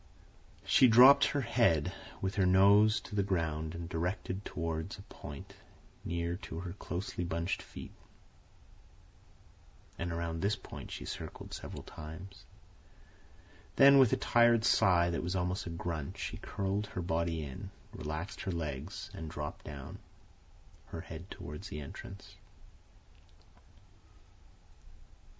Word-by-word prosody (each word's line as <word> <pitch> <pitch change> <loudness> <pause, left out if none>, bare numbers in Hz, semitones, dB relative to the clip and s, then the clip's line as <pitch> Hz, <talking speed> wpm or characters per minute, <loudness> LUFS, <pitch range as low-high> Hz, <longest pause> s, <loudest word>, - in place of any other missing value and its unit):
She 130 - +6
dropped 130 +4 +9
her 145 - 0
head, 115 - +2 0.3
with 95 0 0
her 100 -2 +2
nose 100 +4 +6
to - - -11
the 100 - +2
ground 80 -4 -1
and 85 0 -5
directed 90 +3 -2
toward 80 0 -3
a 100 - -11
point 70 -1 -9 0.5
near 85 0 -2
to 80 -3 -6
her 90 -2 -5
closely 90 -2 -4
bunched 85 +1 -1
feet, - - -10 2.1
and 85 +1 -2
around 85 -1 -2
this 100 +2 +2
point 95 - -9
she - - -6
circled - - -7
several - - -7
times; 90 +4 -10 1.3
then, 140 0 +8
with 130 -5 +6
a - - +3
tired 120 -1 +4
sigh 85 -2 +4
that 85 - -1
was 90 +2 -2
almost 90 +1 -1
a - - -3
grunt, 85 -3 -4
she - - -4
curled 100 +1 -2
her 90 - -4
body 85 -1 0
in, 70 -3 -7 0.2
relaxed 80 +5 -5
her 95 - -2
legs, 80 -1 -4
and 80 -1 -6
dropped 75 -1 -6
down, 70 -3 -8 0.9
her 80 - -6
head 85 +2 -9
toward 75 +4 -7
the 75 - -5
entrance. 95 +7 -9
85 Hz, 130 wpm, -33 LUFS, 80-100 Hz, 2.1 s, dropped